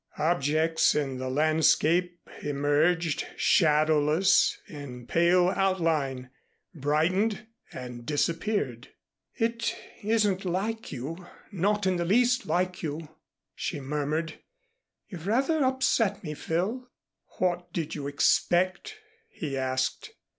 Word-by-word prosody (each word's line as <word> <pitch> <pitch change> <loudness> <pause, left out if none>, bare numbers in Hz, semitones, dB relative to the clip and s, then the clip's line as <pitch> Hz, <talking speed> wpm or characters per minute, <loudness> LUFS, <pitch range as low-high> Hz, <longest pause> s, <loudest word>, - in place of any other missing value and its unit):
Objects 160 0 +2
in 135 -3 -1
the 130 0 -3
landscape 155 +4 +2 0.2
emerged, 145 +3 +1
shadowless, 155 +1 +3
in 135 -5 -9
pale 175 +4 +3
outline, 160 -10 0 0.4
brightened 185 +9 0 0.3
and 125 -1 -8
disappeared. 150 - -1 0.5
"It 230 0 -1 0.3
isn't 210 -3 +1
like 200 +5 -3
you 165 +8 -6 0.2
not 205 +2 0
in 185 -1 +2
the 170 - -1
least 245 +6 +2
like 180 0 0
you," 155 0 -5 0.4
she 155 - -4
murmured. 150 +3 -3 0.7
"You've 175 -1 -8
rather 275 +8 +2
upset 260 -5 +1
me, 150 -3 -4
Phil." 200 - -2 0.5
"What 175 -1 -1
did 165 -1 -3
you 140 -2 -4
expect?" 185 - +1 0.3
he 155 -10 -5
asked. 130 0 -2
165 Hz, 105 wpm, -27 LUFS, 145-190 Hz, 0.7 s, shadowless